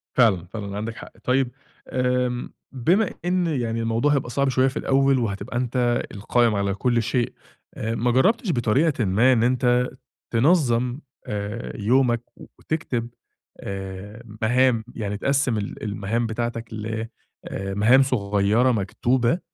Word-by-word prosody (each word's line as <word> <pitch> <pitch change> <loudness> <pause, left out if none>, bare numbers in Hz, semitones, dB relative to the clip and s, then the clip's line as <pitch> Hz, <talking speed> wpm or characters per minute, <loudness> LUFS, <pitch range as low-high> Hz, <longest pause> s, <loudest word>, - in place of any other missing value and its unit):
فعلًا، 105 -9 +4
فعلًا، 100 -3 -5
عندك 110 +2 -4
حق. - - -10
طيب 125 0 +1 0.4
آمم، 125 -1 -1 0.2
بما 175 - +2 0.2
إن 180 0 +1
يعني 120 -7 -1
الموضوع 115 +6 +1
هيبقى 135 -3 0
صعب 140 +3 +1
شوية 130 +1 +3
في 135 - -3
الأول 135 0 +3
وهتبقى 110 +1 -3
أنت 120 -1 +1
القائم 115 +2 +1
على 100 -1 0
كل 120 +3 +1
شيء، 120 +1 -1 0.4
آآ، 110 +1 -3
ما 120 +2 +1
جربتش 190 - +2
بطريقة 130 +1 +1
ما 110 +8 +4
إن 115 -2 +2
أنت 125 0 +2 0.4
تنظم، 125 -2 +2 0.3
آآ 105 +3 -4
يومك 120 +2 +3 0.2
وتكتب، 125 -7 -4 0.5
آآ 100 +3 -7 0.2
مهام، 120 0 +3
يعني 105 -2 -3
تقسِّم 135 -1 +1
ال 100 -1 -5
المهام 105 +3 -1
بتاعتك 115 0 -4
ل 110 +1 -4 0.4
آآ، 95 0 -4
لمهام 110 +7 +5
صغيرة 105 -1 +2
مكتوبة، 120 - +1
120 Hz, 135 wpm, -23 LUFS, 110-130 Hz, 0.5 s, لمهام